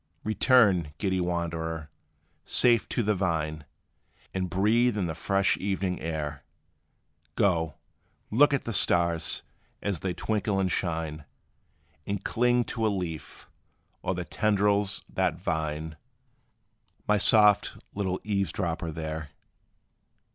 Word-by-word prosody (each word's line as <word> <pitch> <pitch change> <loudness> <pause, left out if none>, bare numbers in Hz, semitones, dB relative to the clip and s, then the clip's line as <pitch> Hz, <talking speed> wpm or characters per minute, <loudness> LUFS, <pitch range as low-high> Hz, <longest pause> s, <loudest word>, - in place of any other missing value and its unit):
Return, 105 - +3
giddy 95 -1 0
wanderer, 80 -3 -3 0.5
safe 115 -10 +3
to 120 - 0
the 105 +1 +2
vine; 80 -5 -2 0.7
And 95 -1 -2
breathe 110 +5 +2
in 95 - 0
the 80 - -2
fresh 95 +4 +1
evening 95 -2 -2
air; 75 -3 -4 0.9
Go, 85 -8 +1 0.6
look 145 +7 +5
at 140 - 0
the 115 - -3
stars, 85 -4 +3 0.4
as 100 -5 -2
they 90 0 -3
twinkle 105 -2 -1
and 95 -1 +1
shine; 80 -4 -2 0.8
And 100 -1 -3
cling 120 +1 +2
to 115 -1 -1
a - - +3
leaf, 90 -6 -5 0.5
or 95 - -1
the 90 0 -4
tendrils 100 -1 +1
that 85 +3 -1
twine, 80 -1 -2 1.1
My 105 -1 +3
soft 105 -1 +4 0.2
little 95 -2 -2
eavesdropper, 95 -5 -1
there! 80 -1 -5
95 Hz, 115 wpm, -27 LUFS, 80-105 Hz, 1.1 s, look